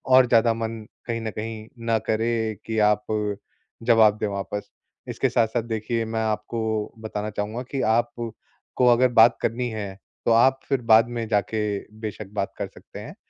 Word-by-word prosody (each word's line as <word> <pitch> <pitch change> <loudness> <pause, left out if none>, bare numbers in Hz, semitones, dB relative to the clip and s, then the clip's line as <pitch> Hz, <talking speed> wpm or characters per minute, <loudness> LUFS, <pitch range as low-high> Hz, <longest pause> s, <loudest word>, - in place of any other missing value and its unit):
और 130 -1 +7
ज़्यादा 115 -1 +4
मन 115 -1 -4 0.2
कहीं 115 -1 -2
न 110 -1 -3
कहीं 110 +1 -6 0.2
ना 115 -1 +3
करे 115 +2 +1 0.3
कि 110 -1 -3
आप 105 0 0 0.8
जवाब 110 -3 +5
दे 105 - 0
वापस। 100 +1 -4 0.4
इसके - - 0
साथ-साथ 115 +1 +1
देखिए 115 0 -2
मैं 110 0 -3
आपको 110 +1 -2 0.4
बताना 105 -1 -4
चाहूँगा 105 +4 -3
कि 135 - -1
आप 120 +1 +2 0.7
को 125 - +4
अगर 125 +2 +4
बात 115 +1 +7
करनी 120 +2 -1
है 105 -3 -5 0.3
तो - - +3
आप 130 +4 +5
फिर 135 -3 +1
बाद 110 +1 +7
में 115 -2 -3
जाके 105 0 0 0.4
बेशक 105 -1 -5
बात 100 -1 -2
कर 100 - -3
सकते - - -13
हैं। - - -9
110 Hz, 170 wpm, -24 LUFS, 105-115 Hz, 0.8 s, और